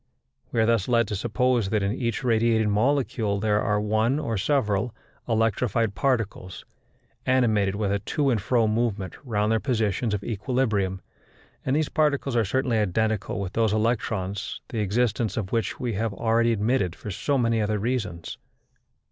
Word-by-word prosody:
We 115 - 0
are 110 - +4
thus 115 -4 +2
led 115 -2 +3
to 105 - -2
suppose 120 +1 +1
that 105 -1 +1
in 100 +2 0
each 120 0 -2
radiating 115 -2 +2
molecule 110 -3 +1
there 105 0 +1
are 105 0 +1
one 110 +5 +1
or 120 -7 -2
several 110 0 0 0.3
electrified 115 0 +1
particles, 105 -8 -2 0.6
animated 110 -7 +2
with 100 -1 -1
a 100 - +1
to 140 +7 0
and 110 -4 0
fro 115 +1 +2
movement 110 -4 -1
round 110 -4 0
their 110 - +2
positions 110 -1 0
of 100 - -5
equilibrium, 105 -4 -1 0.6
and 135 - 0
these 155 -1 +1
particles 140 -4 +1
are 115 - +3
certainly 125 +2 +1
identical 105 +1 0
with 100 -1 -4
those 110 -2 +2
electrons 105 -3 -1
the 115 - -3
existence 110 0 0
of 100 -4 -3
which 115 -3 -1
we 120 -2 -2
have 105 0 -2
already 115 +1 +2
admitted 105 -4 0
for 105 - -7
so 140 +9 0
many 115 -2 +2
other 105 0 0
reasons. 105 -7 -3
110 Hz, 165 wpm, -25 LUFS, 105-120 Hz, 0.6 s, are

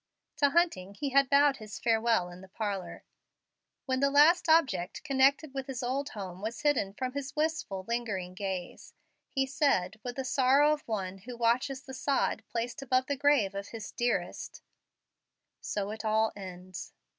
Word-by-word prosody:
To 285 - +4
Hunting 275 - +1
he 280 +6 -2
had 275 -1 +4
bowed 280 -1 +5
his 215 -2 -8
farewell 225 -4 +2
in 175 +1 -11
the 190 - -12
parlor. 200 -1 -4 0.8
When 260 -1 0
the 280 +1 +3
last 315 +4 +5
object 265 - +2
connected 275 0 +3
with 270 0 -4
his 255 -2 -4
old 270 +3 -1
home 190 -3 -7
was 220 +3 -4
hidden 260 -10 +2
from 255 +1 -3
his 280 +1 -5
wistful, 300 -12 -1
lingering 210 -7 -2
gaze, 190 -2 -5 0.3
he 270 -2 0
said, 265 -8 +1
with 245 -1 -5
the 265 - -3
sorrow 275 +3 +4
of 300 - -4
one 195 -4 -3
who 240 +5 -9
watches 255 +4 +1
the 265 - -10
sod 275 +1 0
placed 240 +3 -3
above 255 -1 +1
the 285 - -1
grave 275 -8 +3
of 200 0 -5
his 225 -3 -7
dearest, 240 0 -2 1.0
"So 205 0 -3
it 220 +1 -6
all 220 0 +2
ends." 185 -2 -8
245 Hz, 170 wpm, -30 LUFS, 200-275 Hz, 1.0 s, bowed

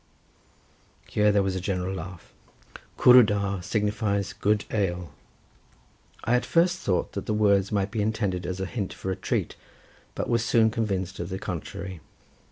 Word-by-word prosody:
Here 105 0 +3
there 100 -1 +3
was 95 -1 -1
a - - -1
general 95 -1 -2
laugh. 95 -2 -8 0.6
Cwrw 125 0 +8
da 100 -2 0
signifies 100 +1 -1
good 105 0 +1
ale. 90 -7 -1 1.1
I 115 - +1
at 125 - +2
first 175 +2 +2
thought 90 - 0
that - - -6
the 105 - 0
words 100 -2 +3
might 100 -1 0
be 110 - -1
intended 100 -4 -1
as 95 0 -4
a 95 - -1
hint 100 0 -4
for 95 - -4
a - - -1
treat, 95 - -2 0.6
but - - -2
was 115 -1 +1
soon 115 -1 +3
convinced 95 -4 -2
of 85 +1 -4
the 95 - -3
contrary. 90 0 -6
100 Hz, 165 wpm, -26 LUFS, 95-110 Hz, 1.1 s, Cwrw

